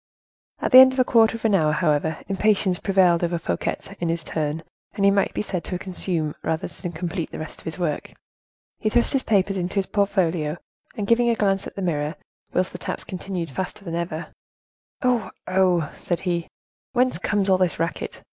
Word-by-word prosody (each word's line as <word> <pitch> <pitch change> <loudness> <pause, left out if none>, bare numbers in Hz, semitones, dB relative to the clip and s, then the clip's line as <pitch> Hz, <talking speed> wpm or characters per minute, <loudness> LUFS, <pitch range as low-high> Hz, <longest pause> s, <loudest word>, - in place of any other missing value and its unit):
At - - -1
the 255 - +11
end 260 0 +9
of - - -7
a - - +6
quarter 225 -2 +4
of 230 - -9
an 220 - +3
hour, 155 -5 +3
however, 155 -1 +1
impatience 195 -2 +2
prevailed 185 -4 +3
over 170 0 0
Fouquet 85 - -2 0.2
in 170 - -1
his 165 0 -1
turn: 155 +1 -2 0.3
he 200 -1 +4
might 200 0 +2
be - - -2
said 185 -4 -3
to 180 - -3
consume, 175 -4 -1
rather 160 0 -1
than 175 - -4
to 165 - -9
complete 175 0 -3
the - - -6
rest 155 - -8
of - - -23
his 160 - -4
work; 165 -5 -2 0.7
he 215 - +1
thrust 235 +5 +3
his 270 - +3
papers 195 -3 +1
into 180 +1 -3
his 195 -1 +2
portfolio, 175 -7 0 0.4
and 205 - -1
giving 235 +3 +3
a 230 - +3
glance 195 -2 +1
at - - -11
the 195 - -4
mirror, 155 -2 -1 0.4
whilst 185 +1 0
the - - -8
taps - - -4
continued 180 -4 -5
faster 190 +6 -5
than 165 - -5
ever: 170 -1 -4 0.7
"Oh! 250 -3 +2 0.2
oh!" 180 -4 +2
said 175 - -2
he, 175 -2 -1 0.5
"whence 250 -7 +2
comes 200 0 0
all 190 -1 +4
this 180 -4 +1
racket? 165 0 -3
185 Hz, 205 wpm, -23 LUFS, 165-200 Hz, 0.7 s, the